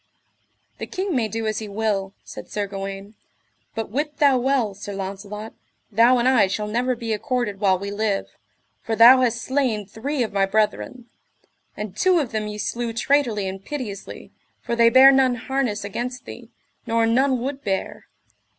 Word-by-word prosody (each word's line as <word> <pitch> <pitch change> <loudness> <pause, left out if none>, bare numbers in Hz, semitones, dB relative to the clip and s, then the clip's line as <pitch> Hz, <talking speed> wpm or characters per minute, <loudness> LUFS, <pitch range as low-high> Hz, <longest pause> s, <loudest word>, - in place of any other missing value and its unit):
The - - -5
king 375 -3 -3
may 235 -4 +1
do 225 +1 -4
as 215 -1 -1
he 215 - -6
will, 200 -2 -2
said - - -10
Sir 205 -1 -2
Gawaine, 195 +1 -7 0.6
but 225 -2 -4
wit 295 +4 -2
thou 275 -3 +4
well, 250 -5 +1
Sir 205 +1 -8
Launcelot, 200 +3 -6 0.4
thou 235 +4 +5
and 240 +1 +1
I 250 -6 +5
shall 210 +2 -2
never 245 +4 0
be 230 -2 -3
accorded 215 -2 -2
while 195 -2 +3
we 200 +2 -5
live, 205 -1 -1 0.6
for 225 - -2
thou 245 +3 +8
hast 240 -1 0
slain 255 -6 0
three 250 +7 -3
of 220 - -5
my 195 -1 +2
brethren; 215 +4 -1 0.7
and 210 -2 -6
two 370 -1 +3
of 285 -7 -1
them 215 -1 -2
ye 210 0 -6
slew 235 +2 -3
traitorly 230 -5 +1
and 190 +1 -6
piteously, 225 -7 -7 0.3
for 235 - -3
they 235 0 +5
bare 260 +3 +8
none 265 -2 +3
harness 245 -4 -2
against 245 +5 -5
thee, - - -10 0.4
nor 230 0 +2
none 255 +3 +2
would 270 +3 -4
bear. 195 -2 -3
225 Hz, 175 wpm, -23 LUFS, 205-255 Hz, 0.7 s, thou